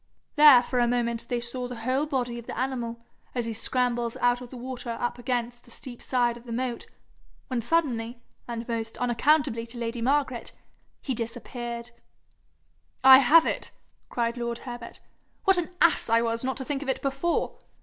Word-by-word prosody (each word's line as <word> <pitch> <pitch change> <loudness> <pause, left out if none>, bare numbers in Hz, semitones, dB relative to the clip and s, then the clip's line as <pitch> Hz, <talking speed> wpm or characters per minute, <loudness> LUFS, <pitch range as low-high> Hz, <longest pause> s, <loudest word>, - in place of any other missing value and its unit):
There 295 -5 +9
for 250 0 -1
a 240 - +3
moment 235 -1 -1
they 245 -2 0
saw 245 +1 -4
the 245 - -6
whole 255 +6 0
body 245 -4 -2
of 235 - -12
the - - -6
animal, 235 -2 -3 0.3
as 240 -2 0
he 230 - -3
scrambled 240 +1 0
out 245 0 +2
of 250 - -9
the 255 - -9
water 245 -1 -5
up 240 0 -2
against 240 -1 -2
the - - -19
steep 240 +1 -5
side 240 -2 +1
of 240 - -15
the 235 - -8
moat 245 0 -3 0.6
when 250 -2 -1
suddenly, 240 -5 0 0.3
and 235 -1 -5
most 225 -1 -3
unaccountably 245 -1 +2
to 235 +1 -9
lady 235 0 -3
Margaret, 260 -1 0 0.5
he 265 - -1
disappeared. 235 0 -5 1.1
'I 265 0 +10
have 310 +5 +6
it!' - - -2 0.4
cried 235 0 -1
lord 235 -1 -2
Herbert. 240 -2 -8 0.4
'What 385 -2 +4
an 330 - -3
ass 335 -7 +4
I 230 +1 +5
was 230 +1 -1
not 265 0 -2
to 265 - -5
think 285 -1 -2
of 285 - -4
it 265 - -1
before! 275 +5 -1
245 Hz, 180 wpm, -27 LUFS, 235-260 Hz, 1.1 s, I